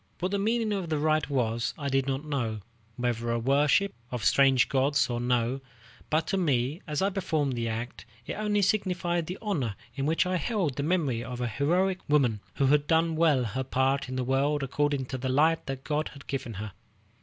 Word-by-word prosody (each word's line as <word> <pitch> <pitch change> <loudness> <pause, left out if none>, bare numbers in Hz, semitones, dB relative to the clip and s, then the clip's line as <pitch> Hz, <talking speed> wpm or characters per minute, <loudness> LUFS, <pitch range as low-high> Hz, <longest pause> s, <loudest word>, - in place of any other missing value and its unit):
What 185 +2 -2
the 200 - 0
meaning 220 +1 +1
of 190 -4 -3
the 155 - 0
rite 155 +1 +1
was, 115 -4 0
I 145 - -4
did 135 -1 +1
not 135 +2 -2
know, 120 -8 -2 0.3
whether 120 -1 -1
a 115 - +1
worship 145 - +2 0.2
of 125 -4 -4
strange 135 -2 +5
gods 140 0 +2
or 120 0 -2
no; 125 +1 0 0.5
but 155 +1 +1
to 195 - +1
me, 145 -2 0
as 150 +3 -1
I 200 - +2
performed 160 -8 0
the 120 -1 -2
act, 115 +3 -5 0.2
it - - -4
only 210 -1 0
signified 180 -4 0
the 180 - -4
honor 140 - -1 0.2
in 135 +2 -2
which 165 +3 +2
I 185 0 0
held 175 - -1
the - - 0
memory 145 -7 0
of 125 +1 -6
a 125 - -1
heroic 180 - +1
woman 130 -8 +3 0.2
who 140 - +2
had 145 +2 +3
done 165 0 +2
well 155 -5 +3
her 125 +3 -2
part 130 +1 0
in 130 - -4
the 130 - -1
world 140 +3 +1
according 140 0 0
to 130 0 -5
the 130 +1 -2
light 155 +5 +2
that 135 -1 -4
God 150 0 -1
had 140 - -13
given 130 -5 -4
her. 105 +1 -5
140 Hz, 210 wpm, -28 LUFS, 125-165 Hz, 0.5 s, strange